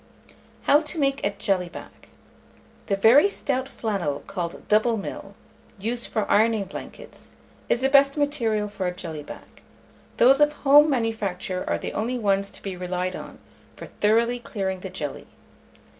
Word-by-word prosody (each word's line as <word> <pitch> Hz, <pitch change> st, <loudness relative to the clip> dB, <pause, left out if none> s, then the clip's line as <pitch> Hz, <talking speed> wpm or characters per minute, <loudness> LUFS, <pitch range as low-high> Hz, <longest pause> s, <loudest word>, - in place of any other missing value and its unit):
HOW 290 Hz, +2 st, +5 dB
TO 315 Hz, +2 st, -3 dB
MAKE 275 Hz, -2 st, 0 dB
A -, -, +2 dB
JELLY 195 Hz, -3 st, -1 dB
BAG. -, -, -12 dB, 0.8 s
The 200 Hz, -, +1 dB
very 240 Hz, -, +6 dB
stout 260 Hz, -8 st, -3 dB
flannel 195 Hz, -, -3 dB
called 175 Hz, -3 st, -5 dB
double 220 Hz, +2 st, +3 dB
mill, 200 Hz, -, -7 dB, 0.4 s
used 235 Hz, +4 st, -2 dB
for 215 Hz, -, -1 dB
ironing 220 Hz, 0 st, +3 dB
blankets, 195 Hz, -, -10 dB, 0.4 s
is 240 Hz, -, +1 dB
the 265 Hz, -, +3 dB
best 275 Hz, +1 st, +5 dB
material 235 Hz, -8 st, 0 dB
for 195 Hz, -3 st, -4 dB
a 180 Hz, -, -3 dB
jelly 165 Hz, -5 st, -6 dB
bag: -, -, -12 dB, 0.6 s
those 270 Hz, +4 st, +5 dB
of 295 Hz, 0 st, +4 dB
home 295 Hz, +2 st, +7 dB
manufacture 210 Hz, -7 st, -2 dB
are -, -, 0 dB
the -, -, -6 dB
only 240 Hz, +4 st, -2 dB
ones 200 Hz, -3 st, +1 dB
to -, -, -12 dB
be 195 Hz, -2 st, -4 dB
relied 180 Hz, 0 st, -3 dB
on -, -, -9 dB, 0.4 s
for -, -, -9 dB
thoroughly 230 Hz, +3 st, +1 dB
clearing 190 Hz, -5 st, -4 dB
the 190 Hz, -, -7 dB
jelly. 160 Hz, -6 st, -6 dB
215 Hz, 160 wpm, -24 LUFS, 190-255 Hz, 0.8 s, home